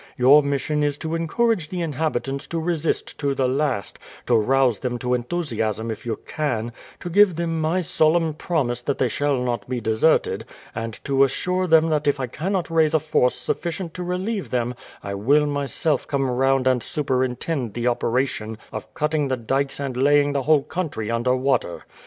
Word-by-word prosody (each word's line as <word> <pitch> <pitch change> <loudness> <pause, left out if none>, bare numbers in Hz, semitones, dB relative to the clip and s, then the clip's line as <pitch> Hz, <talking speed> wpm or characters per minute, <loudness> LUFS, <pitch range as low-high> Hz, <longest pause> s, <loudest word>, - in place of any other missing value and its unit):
Your 135 +4 +7
mission 145 +1 -1
is 145 -1 0
to 160 +1 -4
encourage 165 +2 0
the 180 -2 -3
inhabitants 140 -3 -2
to 165 - -3
resist 165 -1 -2
to 140 -2 0
the 130 -1 +1
last, 130 -5 -1 0.3
to 120 - +3
rouse 125 +1 +3
them 125 -1 -2
to 125 +1 -1
enthusiasm 115 -5 -2
if 110 - -7
you 115 - -1
can, 120 -7 -2 0.3
to - - -6
give 190 0 +5
them 165 -1 -1
my 165 +4 +1
solemn 160 0 +2
promise 140 -7 -1
that 140 +2 -2
they 130 - +2
shall 145 +2 0
not 120 -1 -3
be 125 -1 -1
deserted, 110 +7 +2 0.3
and 115 -1 -5
to 135 0 +3
assure 180 +7 0
them 160 -1 +5
that 150 -1 0
if 145 -1 +2
I 130 - -1
cannot 170 - -3
raise 160 -1 +3
a - - +5
force 140 -5 +1
sufficient 170 0 -3
to 180 - -6
relieve 185 +4 -3
them 120 -1 -1 0.3
I 100 - -4
will 140 +10 +3
myself 145 +1 -1
come 135 -1 0
round 135 +1 +2
and 130 -2 +3
superintend 130 - -1
the 120 0 -2
operation 120 -2 0
of - - -7
cutting 150 -1 0
the 130 -1 -1
dykes 135 +4 -1
and 135 -3 -3
laying 145 +2 +3
the 140 - 0
whole 150 +1 +3
country 145 -12 -3
under 120 +2 +1
water. 130 -9 0
140 Hz, 180 wpm, -23 LUFS, 125-160 Hz, 0.3 s, Your